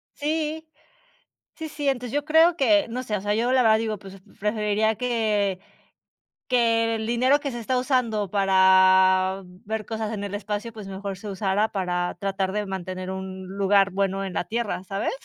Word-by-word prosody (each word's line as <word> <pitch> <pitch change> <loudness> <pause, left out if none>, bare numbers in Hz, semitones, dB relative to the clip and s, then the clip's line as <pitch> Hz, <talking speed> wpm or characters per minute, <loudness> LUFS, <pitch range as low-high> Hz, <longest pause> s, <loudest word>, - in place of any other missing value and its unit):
Sí. 310 +1 -2 0.9
Sí, 320 -1 -6
sí, 290 -1 -1
entonces 245 -2 -3
yo 290 0 0
creo 325 +2 +5
que 305 -2 +3
no 250 +2 -4
sé, 215 -3 -2
o - - -7
sea, 205 +1 0
yo 240 +3 +1
la 260 - +4
verdad 220 -2 +5
digo, 220 -2 -3
pues, 195 -1 -12 0.2
preferiría 210 +1 0
que, 215 -6 0 0.9
que 230 -2 +2
el 220 0 -4
dinero 255 +5 +3
que 280 -1 -4
se 240 - -5
está 255 +3 -2
usando 235 -6 0
para 190 -1 +4 0.2
ver 220 0 -3
cosas 220 -1 -4
en 205 -2 -4
el 200 0 -5
espacio, 210 +2 -4
pues 215 -3 -9
mejor 195 0 -6
se 210 +1 -9
usara 200 +2 0
para 180 -2 -2
tratar 195 -1 -1
de 210 0 -1
mantener 185 0 -5
un 190 0 -6
lugar 195 +1 +2
bueno 195 0 -1
en 190 -2 -5
la 175 - -2
Tierra, 225 -5 -3
¿sabes? 195 +1 -2
210 Hz, 180 wpm, -24 LUFS, 195-240 Hz, 0.9 s, creo